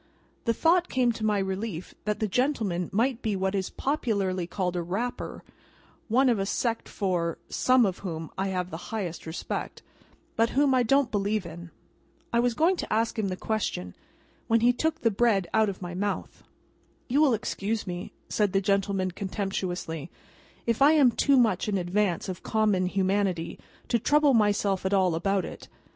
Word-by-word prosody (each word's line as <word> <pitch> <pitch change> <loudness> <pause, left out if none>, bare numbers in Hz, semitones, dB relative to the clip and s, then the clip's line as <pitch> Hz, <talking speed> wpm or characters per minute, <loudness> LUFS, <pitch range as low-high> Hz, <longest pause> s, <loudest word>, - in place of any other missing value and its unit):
The 230 - +2
thought 345 +5 +3
came 250 -2 +2
to 225 -1 -6
my 210 -1 +2
relief 190 -2 -3
that 210 -1 -1
the 215 - 0
gentleman 210 -6 0
might 240 +4 +1
be 215 -3 -1
what 190 0 -1
is 190 -2 -1
popularly 200 - -1
called 180 -1 -2
a 175 - 0
Rapper: 205 +9 -4 0.6
one 255 +4 +3
of 235 -5 +3
a 195 - 0
sect 230 +2 -1
for 175 -4 -1
(some 255 -2 +4
of) 190 -2 -2
whom 165 -4 -5
I 195 +1 -1
have 180 -1 -2
the 160 - -7
highest 185 -8 -4
respect, 160 - -5 0.5
but 230 0 +3
whom 280 -1 +4
I 255 - +4
don't 270 +2 +2
believe 205 -1 0
in. 170 +1 -9 0.6
I 235 - +4
was 240 -1 +1
going 345 +7 +3
to - - -5
ask 225 +1 +1
him 210 - 0
the 185 -1 -3
question, 185 - -2 0.5
when 230 0 +3
he 245 +1 +5
took 320 +6 -1
the 230 - +3
bread 200 -4 +2
out 220 -1 +4
of 190 -1 -6
my 175 0 -5
mouth. 200 +3 -3 0.7
"You 275 +4 +2
will 275 -6 +5
excuse 215 0 -3
me," 180 -1 -5 0.2
said 205 -3 0
the 195 - +4
gentleman 195 -1 0
contemptuously, 185 -5 -4 0.6
"if 230 +2 0
I 290 +3 +7
am 280 -6 +5
too 275 +4 +3
much 220 -5 +2
in 200 - +1
advance 180 0 0
of 185 -2 -5
common 210 -4 +1
humanity 190 -2 0 0.3
to 235 - +2
trouble 290 +4 +4
myself 205 -3 +2
at 190 +1 +1
all 185 -3 +3
about 190 +3 0
it. - - -9
205 Hz, 180 wpm, -27 LUFS, 185-235 Hz, 0.7 s, I